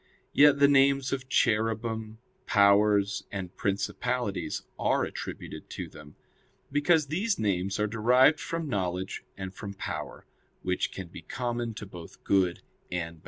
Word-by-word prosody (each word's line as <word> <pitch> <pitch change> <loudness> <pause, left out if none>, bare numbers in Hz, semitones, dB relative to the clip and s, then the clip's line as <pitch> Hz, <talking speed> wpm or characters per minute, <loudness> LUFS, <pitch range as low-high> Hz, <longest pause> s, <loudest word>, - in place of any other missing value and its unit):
Yet 145 -1 +7
the 140 0 +6
names 135 -1 +4
of 135 -1 -4
Cherubim, 110 -1 0 0.3
Powers, 100 -1 +4
and 95 -3 -5
Principalities 105 +2 -2 0.2
are - - +2
attributed - - -6
to - - -5
them; 75 -1 -14 0.6
because 145 +1 +3
these 200 +7 0
names 95 -2 0
are 105 - +2
derived 125 +7 +4
from 165 -1 -3
knowledge 95 -5 -2
and 95 -1 -6
from 100 -1 -7
power, - - -6 0.4
which 90 0 0
can 95 -3 -7
be 85 - -10
common 120 +4 -3
to 105 - -6
both 90 -4 -12
good 95 -3 +2 0.3
and 85 -2 -3
bad. - - -20
105 Hz, 140 wpm, -28 LUFS, 95-130 Hz, 0.6 s, Yet